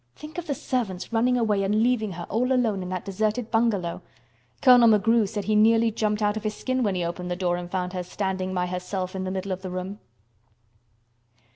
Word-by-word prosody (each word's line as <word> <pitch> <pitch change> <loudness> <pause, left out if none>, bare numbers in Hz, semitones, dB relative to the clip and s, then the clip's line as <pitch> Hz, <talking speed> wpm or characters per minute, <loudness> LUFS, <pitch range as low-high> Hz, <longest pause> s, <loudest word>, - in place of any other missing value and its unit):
Think 310 +3 -8
of 345 - -8
the 285 - -1
servants 225 -7 -3
running 250 +2 +3
away 215 -4 +1
and 210 +3 +2
leaving 225 -5 +1
her 175 0 -6
all 250 +4 0
alone 230 -7 +1
in 180 - -5
that 185 -1 -4
deserted 215 +4 -1
bungalow. 215 -7 0 0.6
Colonel 245 -3 +7
McGrew 220 0 +3
said 210 -2 -3
he 215 - +1
nearly 225 +1 +4
jumped 210 -1 -1
out 205 0 +2
of 220 - -4
his 215 -1 -2
skin 255 0 -1
when 205 -5 +1
he 175 -1 -1
opened 180 +1 -4
the 180 - -1
door 175 -1 0
and 175 0 -6
found 180 0 -2
her 180 - -2
standing 190 +1 -3
by 180 -1 0
herself 180 +1 -4
in 190 0 -3
the 185 - -3
middle 190 +1 -3
of 185 0 -3
the 190 - -5
room." 185 +3 -5
205 Hz, 220 wpm, -25 LUFS, 185-230 Hz, 0.6 s, Colonel